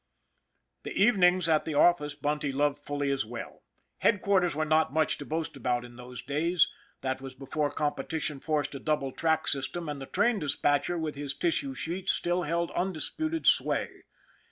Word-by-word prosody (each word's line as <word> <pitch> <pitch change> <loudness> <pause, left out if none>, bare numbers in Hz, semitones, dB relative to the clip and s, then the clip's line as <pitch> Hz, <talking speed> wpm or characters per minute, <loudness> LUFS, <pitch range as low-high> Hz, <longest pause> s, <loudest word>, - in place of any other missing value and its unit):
The - - -7
evenings 185 -5 +4
at 155 -2 +3
the 155 - -3
office 150 -2 +4
Bunty 145 -1 -1
loved 145 +1 +1
fully 145 -1 -2
as 135 -1 0
well. 120 +2 -8 0.4
Headquarters 190 -6 +2
were 155 +1 0
not 155 -2 +3
much 155 +1 +1
to 145 - -6
boast 160 -1 -3
about 125 -2 -1
in 120 0 -13
those 125 0 -9
days. 160 +6 +2 0.3
That 130 0 -2
was 135 -1 -8
before 145 +3 -2
competition 145 +1 -2
forced 150 -1 -1
a 140 - -5
double 150 -3 -1
track 160 +2 +1
system, 155 +5 -2
and 145 -2 -4
the 135 - -7
train 210 +3 +2
dispatcher, 145 +2 +1
with 160 -2 -2
his 140 -1 -4
tissue 140 -6 0
sheets, 180 +7 +1
still 175 +1 +1
held 170 +1 -1
undisputed 310 - -2
sway. - - +2
150 Hz, 170 wpm, -29 LUFS, 140-170 Hz, 0.4 s, evenings